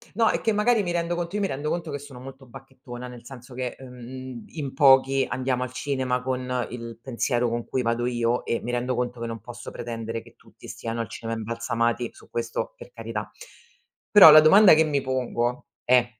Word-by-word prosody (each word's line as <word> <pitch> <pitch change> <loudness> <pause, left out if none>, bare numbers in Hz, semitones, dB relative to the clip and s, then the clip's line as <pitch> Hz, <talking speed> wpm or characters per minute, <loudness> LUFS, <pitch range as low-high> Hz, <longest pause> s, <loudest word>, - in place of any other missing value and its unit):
No, 225 -1 +4
è - - 0
che 220 - +1
magari 210 +1 +2
mi 175 - -3
rendo 170 0 -1
conto 175 +3 -4
io 205 - -1
mi - - +2
rendo 145 +3 -4
conto 170 -2 -3
che 140 - -4
sono 140 -3 -11
molto 135 0 -11
bacchettona, 125 -1 -11
nel 125 -1 -11
senso 125 -1 -12
che, 125 -1 -4
ehm, 125 -1 -9
in 140 -5 -6
pochi 135 -1 +5
andiamo 130 -1 -1
al 125 0 -4
cinema 130 -2 -1
con 125 -1 -2
il 115 -1 -8
pensiero 120 -1 -1
con 120 0 -3
cui 130 - -2
vado 115 +1 0
io, 120 0 0
e 115 - -1
mi 120 - -4
rendo 125 +1 -1
conto 125 -1 -3
che 115 - -3
non 115 -2 -6
posso 120 +2 -9
pretendere 115 -1 -5
che - - -18
tutti - - -17
stiano 115 0 -5
al 115 - -3
cinema 115 0 -5
imbalsamati, 115 +1 -1
su - - -18
questo, 120 - -4
per - - -13
carità. - - -6 0.8
Però 195 -7 +10
la 155 +1 +10
domanda 190 +3 +8
che 160 - +4
mi 145 -2 0
pongo 125 -2 -2 0.2
è: 125 -1 +5
125 Hz, 210 wpm, -25 LUFS, 120-140 Hz, 0.8 s, Però